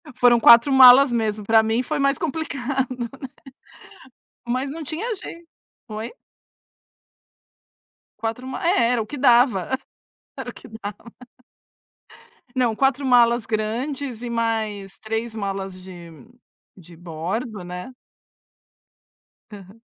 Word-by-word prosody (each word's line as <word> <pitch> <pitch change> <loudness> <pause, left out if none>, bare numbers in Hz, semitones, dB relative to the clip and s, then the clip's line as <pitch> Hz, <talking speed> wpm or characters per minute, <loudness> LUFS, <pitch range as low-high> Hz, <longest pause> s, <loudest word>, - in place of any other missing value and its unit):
Foram 245 -2 +4
4 235 +5 +7
malas 265 +1 +8
mesmo, 215 -3 -1
pra 225 +1 +5
mim 225 +3 0
foi 305 +3 -3
mais 275 -1 +2
complicado. 270 -5 -3 1.4
Mas 255 +3 -2
não 320 +1 -7
tinha 390 - -4
jei 340 -1 -10 0.5
Oi? 215 +1 -6 2.1
4 230 +3 -4
ma 300 +5 -4
é, 235 -9 +3
era 240 -2 +1
o - - -4
que 285 +7 -8
dava. 245 -7 +3 0.7
Era - - -6
o - - -9
que - - -13
dava. 220 0 -9 1.5
Não, 245 -3 +1
4 270 +3 +1
malas 240 -2 +4
grandes 240 +3 -3
e 245 - -5
mais 220 -4 -3
3 225 +1 -4
malas 195 -3 -5
de 175 -2 -12 0.7
de 175 0 -15
bordo, 180 +6 -5
né. 180 +7 -8 1.6
Aham. 200 +1 -13
235 Hz, 115 wpm, -22 LUFS, 215-260 Hz, 2.1 s, malas